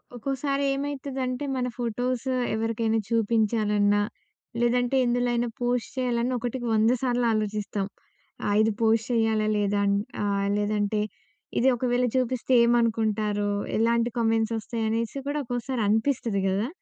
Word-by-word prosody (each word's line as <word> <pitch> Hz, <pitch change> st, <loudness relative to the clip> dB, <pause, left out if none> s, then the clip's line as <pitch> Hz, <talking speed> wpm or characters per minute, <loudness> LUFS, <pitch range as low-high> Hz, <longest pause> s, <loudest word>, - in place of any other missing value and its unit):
ఒక్కోసారి 275 Hz, +3 st, -2 dB
ఏమైతుందంటే 275 Hz, -1 st, -3 dB
మన 250 Hz, -1 st, -1 dB
ఫోటోసు 245 Hz, +2 st, -2 dB, 0.2 s
ఎవరికైనా 225 Hz, 0 st, 0 dB
చూపించాలన్నా 215 Hz, -2 st, +2 dB, 0.6 s
లేదంటే 245 Hz, +2 st, +2 dB
ఎందులో 245 Hz, 0 st, +1 dB
అయినా 240 Hz, 0 st, 0 dB
పోస్ట్ 245 Hz, -1 st, 0 dB
చేయాలన్నా 250 Hz, -1 st, 0 dB
ఒకటికి 245 Hz, +1 st, -3 dB
వంద 220 Hz, +2 st, +4 dB
సార్లు 245 Hz, -2 st, +1 dB
ఆలోచిస్తాం. 210 Hz, -2 st, -2 dB, 0.6 s
ఆ! -, -, 0 dB
ఇది 220 Hz, +1 st, +3 dB
పోస్ట్ 225 Hz, 0 st, +3 dB
చేయాలా? 220 Hz, -2 st, +2 dB
లేదా? 205 Hz, 0 st, +1 dB
అని. 200 Hz, 0 st, +2 dB, 0.2 s
ఆ! -, -, 0 dB, 0.3 s
లేదంటే 210 Hz, 0 st, 0 dB, 0.6 s
ఇది 255 Hz, -, +3 dB
ఒకవేళ 245 Hz, +1 st, +1 dB
చూపిస్తే 255 Hz, 0 st, -1 dB
ఏమనుకుంటారో? 215 Hz, -3 st, +1 dB, 0.3 s
ఎలాంటి 235 Hz, +1 st, +2 dB
కామెంట్స్ 225 Hz, -1 st, +1 dB
వస్తాయి? 225 Hz, +1 st, -4 dB
అనేసి 230 Hz, +3 st, -2 dB
కూడా 295 Hz, +1 st, -1 dB
ఒక్కోసారి 245 Hz, 0 st, -3 dB
అనిపిస్తది 225 Hz, -1 st, +1 dB
కదా! 200 Hz, +4 st, 0 dB
230 Hz, 125 wpm, -26 LUFS, 215-245 Hz, 0.6 s, వంద